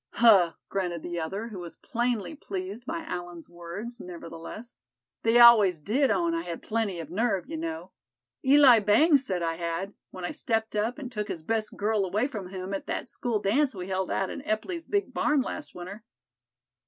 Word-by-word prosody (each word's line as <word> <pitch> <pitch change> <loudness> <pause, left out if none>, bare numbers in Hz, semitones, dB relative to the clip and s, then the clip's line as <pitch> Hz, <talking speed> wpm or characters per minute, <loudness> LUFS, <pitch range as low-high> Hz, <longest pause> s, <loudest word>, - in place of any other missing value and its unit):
"Huh!" 200 -8 +6
grunted 175 -4 -2
the 175 -1 -3
other, 195 +8 -4
who 200 -5 -7
was 170 -1 -8
plainly 240 -3 -2
pleased 200 -2 -6
by 325 +1 -3
Allan's 175 - -6
words 175 +8 -8
nevertheless; 175 +6 -9 0.4
"they 225 +1 +4
always 215 -8 +8
did 250 - +1
own 340 -1 +1
I 335 - 0
had 170 - -6
plenty 215 -5 -1
of 160 -1 -7
nerve, 210 0 0
you 325 - -5
know. 325 0 -5 0.5
Eli 265 -3 +7
Bangs 265 +8 +4
said 185 -8 -2
I 165 0 -1
had, 170 +4 -3 0.2
when 185 -1 -7
I - - -3
stepped 225 -3 -2
up 220 +5 0
and 265 -4 -7
took 210 -3 -3
his 165 - -5
best 220 +4 -2
girl 210 0 +1
away 210 +7 0
from 210 -10 -6
him 190 0 -5
at 195 - -4
that - - -3
school 235 -3 -1
dance 245 +7 +1
we 185 0 -6
held 190 -1 -1
out 195 - -1
in - - -6
Epply's 330 - -3
big 405 -1 -1
barn 295 -3 +2
last 305 +3 -6
winter." 185 +5 -8
210 Hz, 190 wpm, -27 LUFS, 180-245 Hz, 0.5 s, always